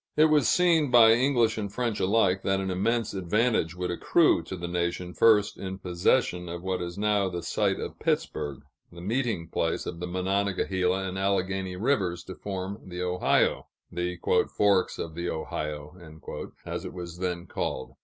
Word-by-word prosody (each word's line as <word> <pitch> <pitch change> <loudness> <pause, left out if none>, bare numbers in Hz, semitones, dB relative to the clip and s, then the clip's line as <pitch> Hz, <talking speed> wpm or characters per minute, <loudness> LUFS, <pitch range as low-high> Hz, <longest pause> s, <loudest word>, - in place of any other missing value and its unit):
It 155 0 +5
was 150 -3 +4
early 180 0 +4
seen, 160 -4 +3
by 120 -2 +7
English 120 -2 +3
and 100 -2 -4
French 115 -2 -2
alike, 95 -1 +2
that 95 0 +1
an 95 -1 -2
immense 115 +5 0
advantage 95 -1 +1
would 90 0 -3
accrue 150 - +3
to 95 - -6
the 85 0 -5
nation 90 +1 -2
first 105 -1 +4
in 95 0 -5
possession 90 0 0
of 85 +1 -6
what 95 -1 -2
is 85 +1 -5
now 105 -2 +1
the 85 -2 -5
site - - 0
of - - -6
Pittsburg, 70 -2 -2 0.3
the 85 - -12
meeting 105 -3 -1
place 80 0 -1
of 85 - -5
the 90 - -4
Monongahela 95 0 0
and 95 +1 -4
Alleghany 95 -1 -1
rivers 95 -6 0
to 95 - -8
form 95 +1 -5
the 90 -1 -5
Ohio 90 0 +1 0.2
the 90 0 -3 0.3
"Forks 100 -2 +2
of 80 - -5
the 85 +2 -3
Ohio," 75 -1 -4 0.7
as - - -4
it - - -7
was 85 -1 -7
then 90 -2 -2
called. - - -4
95 Hz, 175 wpm, -27 LUFS, 90-105 Hz, 0.7 s, by